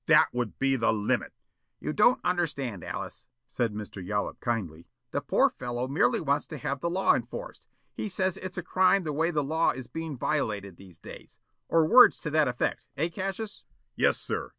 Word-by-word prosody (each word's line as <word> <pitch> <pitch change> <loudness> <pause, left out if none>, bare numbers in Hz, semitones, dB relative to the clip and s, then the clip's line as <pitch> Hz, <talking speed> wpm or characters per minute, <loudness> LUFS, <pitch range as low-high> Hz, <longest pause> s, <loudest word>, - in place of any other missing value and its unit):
"That - - +5
would 120 -3 -3
be 135 0 +2
the 115 - +2
LIMIT!" 105 -2 0 0.5
"You - - -3
don't 215 +7 +4
understand, 140 - -1
Alice," - - -6 0.2
said 115 -2 -1
Mr. 105 -2 -7
Yollop 105 +3 -2
kindly. 90 -9 -3 0.2
"The - - -1
poor - - +3
fellow 120 0 -4
merely 130 -2 +2
wants 140 -2 0
to - - -7
have 140 -2 -3
the 170 - 0
law 185 +3 +3
enforced. - - -5 0.3
He 215 - -4
says 185 -1 +1
it's 185 0 -7
a 180 - -3
crime 185 +2 +3
the 155 -2 -3
way 160 +3 +1
the 150 -4 0
law 160 +4 +2
is 130 0 -3
being 160 +2 -6
violated 105 - -2
these 95 -3 -14
days. - - -12 0.3
Or 165 -1 +4
words 245 +10 +7
to 150 - -4
that 155 -1 +3
effect, 125 +1 -2
eh, 165 +4 +1
Cassius?" 195 +5 -5 0.3
"Yes, - - +3
sir. - - -3
145 Hz, 190 wpm, -28 LUFS, 120-175 Hz, 0.5 s, words